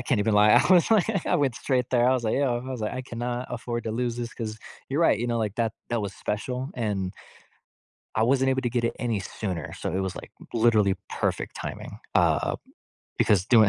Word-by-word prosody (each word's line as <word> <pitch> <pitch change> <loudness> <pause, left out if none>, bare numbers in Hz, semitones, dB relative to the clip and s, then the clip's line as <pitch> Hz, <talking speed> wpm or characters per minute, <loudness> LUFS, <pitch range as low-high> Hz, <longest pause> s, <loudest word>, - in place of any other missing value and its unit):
I - - -4
can't 125 -3 +1
even 105 +1 +2
lie. 105 +1 +6
I 185 - +6
was 180 +2 +5
like 210 -3 +2
I - - +3
went 135 -5 +1
straight 125 -3 0
there. 120 -1 +4
I 130 - +5
was 125 -3 0
like, 110 - +1
"Yo," 130 -3 +1
I - - -5
was 125 -3 -4
like, 105 - -2
"I 130 - -3
cannot 120 0 -4
afford 120 0 -4
to 110 - -2
lose 120 0 -1
this 120 -1 -5
'cause" 110 -2 -5 0.3
you're 140 +4 0
right, 165 -10 +4
you 120 - -1
know, 120 -1 0
like, 105 -2 -1
that 115 -2 0 0.2
that 120 -2 0
was 100 - -3
special, 125 +6 -3
and 100 -6 -2 1.0
I 110 - +3
wasn't 135 +2 +3
able 130 0 +1
to 120 - 0
get 120 0 -1
it 115 - 0
any 115 -4 -1
sooner. 90 -4 -4
So - - -4
it 95 - 0
was, 95 -1 -2
like, - - -9 0.2
literally 110 -4 +4
perfect - - -2
timing, - - -6 0.2
uh, - - +3 0.6
because 100 -2 +3
doing 110 -4 +6
120 Hz, 230 wpm, -26 LUFS, 110-125 Hz, 1.0 s, lie